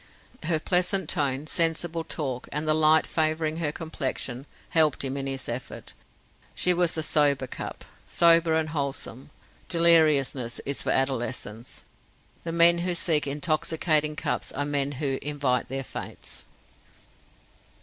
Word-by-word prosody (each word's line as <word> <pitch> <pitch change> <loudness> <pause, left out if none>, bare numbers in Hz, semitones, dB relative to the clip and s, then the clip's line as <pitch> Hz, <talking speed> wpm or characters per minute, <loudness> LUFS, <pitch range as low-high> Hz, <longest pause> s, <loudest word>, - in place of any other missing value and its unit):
Her 160 0 0
pleasant 180 +1 +2
tone, 140 0 0
sensible 165 +1 +1
talk, 135 -6 -4
and 150 +2 -3
the 155 - +4
light 155 0 +4
favouring 155 0 0
her 160 -3 -1
complexion, 135 -4 -4 0.2
helped 155 -4 +2
him 135 0 -3
in 135 -1 -3
his 135 -1 -2
effort. 120 +1 -6 0.6
She 180 - +3
was 175 -2 +1
a 160 - 0
sober 145 -4 +2
cup; 125 - -7 0.2
sober 165 -1 +4
and 160 -1 0
wholesome. 140 -3 -4 0.4
Deliriousness 155 -8 +3
is 140 0 -2
for - - -3
adolescence. 125 -3 -2 0.6
The 165 - -4
men 170 +1 +5
who 175 0 -1
seek 160 -4 +2
intoxicating 155 +1 0
cups - - -2
are 145 - -2
men 145 -1 -1
who 135 0 -2
invite 140 -4 -1
their 135 +1 -3
fates. - - -8
150 Hz, 135 wpm, -26 LUFS, 135-165 Hz, 0.6 s, men